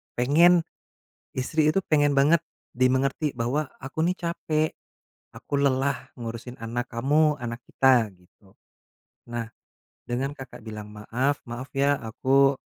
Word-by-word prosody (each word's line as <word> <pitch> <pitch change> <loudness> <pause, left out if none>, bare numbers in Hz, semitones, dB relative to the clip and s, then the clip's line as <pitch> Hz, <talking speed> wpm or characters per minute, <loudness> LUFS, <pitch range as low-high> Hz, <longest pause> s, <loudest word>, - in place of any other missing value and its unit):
pengen 165 +7 +5 0.7
istri 150 +4 +1
itu 185 +5 +2
pengen 145 -2 +4
banget 145 +5 +5 0.3
dimengerti 130 +3 +1
bahwa, 130 +6 -1 0.2
"Aku 135 +3 -6
ini 180 +1 +1
capek, 160 -3 -1 0.6
aku - - -8
lelah 140 0 0
ngurusin 120 +1 -7
anak 120 +2 -4
kamu, 150 +5 +2
anak 120 -1 -5
kita," 125 -5 +3
gitu. 95 +2 -25 0.8
Nah, 115 -1 -3 0.6
dengan 130 +4 -1
Kakak 130 -5 -11
bilang 105 -2 -7
maaf, 125 +7 -1
"Maaf 120 +3 -7
ya, 140 +1 +2
aku, 135 +5 +3
135 Hz, 125 wpm, -26 LUFS, 120-145 Hz, 0.8 s, pengen